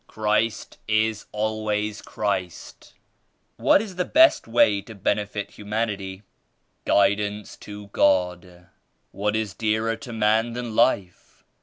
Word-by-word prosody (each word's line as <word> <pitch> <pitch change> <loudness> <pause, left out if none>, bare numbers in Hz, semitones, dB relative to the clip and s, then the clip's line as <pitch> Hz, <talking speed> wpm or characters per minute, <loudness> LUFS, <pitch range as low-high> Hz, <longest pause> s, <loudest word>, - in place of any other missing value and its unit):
Christ 110 +1 -1
is 110 0 0
always 105 0 -2
Christ." 95 -5 -4 0.6
"What 200 - +4
is 190 -5 -9
the 180 - +1
best 325 - +4
way 105 -3 +3
to 110 +3 -12
benefit 105 +1 -2
humanity?" 105 -2 -4 0.6
"Guidance 100 +1 +1
to 105 0 -10
God. 90 -2 0 0.5
What 105 +2 -1
is 110 -4 -2
dearer 110 +1 0
to 120 +2 -9
man 110 +1 +1
than 120 -2 -5
life? 100 -7 0
105 Hz, 115 wpm, -24 LUFS, 100-110 Hz, 0.6 s, What